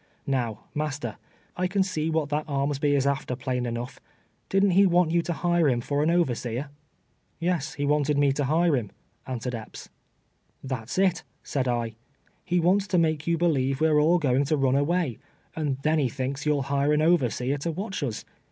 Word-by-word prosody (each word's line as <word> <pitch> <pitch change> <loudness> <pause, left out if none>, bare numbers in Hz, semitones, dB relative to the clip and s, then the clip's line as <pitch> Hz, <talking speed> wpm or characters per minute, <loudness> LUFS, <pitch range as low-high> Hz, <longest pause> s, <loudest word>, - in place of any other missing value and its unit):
Kow, 120 -6 -1
master, 150 -1 -3 0.4
I 180 0 0
can 195 +1 +1
see 160 -4 -2
what 160 -2 0
that 150 +1 -2
Armsby 140 +1 +1
is 135 -1 +1
after, 140 -2 -1
plain 125 -1 -2
enough. 120 +2 -5 0.5
Did'nt 195 -1 +3
he 195 +2 +6
want 175 -2 +3
you 170 0 +3
to 170 - -4
hire 175 -2 +2
him 120 -2 +1
for 145 +4 -1
an 155 - +2
overseer?'' 135 -5 0 0.3
" - - -43
Yes, 165 -4 -1
he 145 - -2
wanted 150 0 +2
me 140 -1 +4
to 140 +1 -1
hire 160 +3 +3
him," 115 -6 -3 0.4
answered 125 -1 -4
Epps. 110 -2 -8 0.4
" - - -22
Tliat's 130 -1 -4
it," 190 -2 +2 0.2
said 130 -3 -2
I, 120 -2 -1 0.5
''he 180 0 +2
wants 190 +4 +2
to 185 -2 +1
make 160 -2 +1
you 170 0 +2
believe 135 -6 +1
we're 155 -1 +4
all 165 +4 +4
going 140 -3 +2
to 155 +2 +1
run 135 -2 +2
aM'ay, 145 -1 0 0.4
and 145 -4 -1
then 155 +1 +2
he 135 -4 +1
thinks 135 +4 -4
you'll 145 -2 +2
hire 140 +2 +1
an 150 +1 +2
overseer 140 -4 +1
to 165 +4 -2
watch 190 +2 -4
us. 125 -7 -3
145 Hz, 195 wpm, -26 LUFS, 130-170 Hz, 0.5 s, he